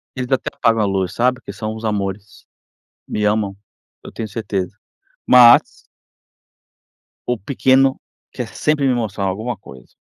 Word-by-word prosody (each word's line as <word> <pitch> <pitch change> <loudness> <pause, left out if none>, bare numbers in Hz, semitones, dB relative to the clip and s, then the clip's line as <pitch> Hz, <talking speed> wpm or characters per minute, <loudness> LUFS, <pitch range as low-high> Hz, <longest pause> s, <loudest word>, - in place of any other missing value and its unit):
Eles 130 0 -5
até 130 - 0
apagam 115 -2 +2
a - - +2
luz, 95 -2 -1
sabe. 125 +1 +1
Porque - - -9
são 110 0 -5
uns 110 - -9
amores, 100 -1 -4 0.6
me 105 - -2
amam, 105 -2 0 0.5
eu - - -10
tenho 110 -1 -5
certeza. 100 -3 -4 0.5
Mas 120 -1 +6 1.5
o 125 -1 0
pequeno 130 +4 +2 0.3
quer 125 -3 -5
sempre 150 +1 0
me 130 - +3
mostrar 110 -4 -2
alguma 110 +6 -3
coisa. 65 - -15
110 Hz, 145 wpm, -19 LUFS, 100-125 Hz, 1.5 s, Mas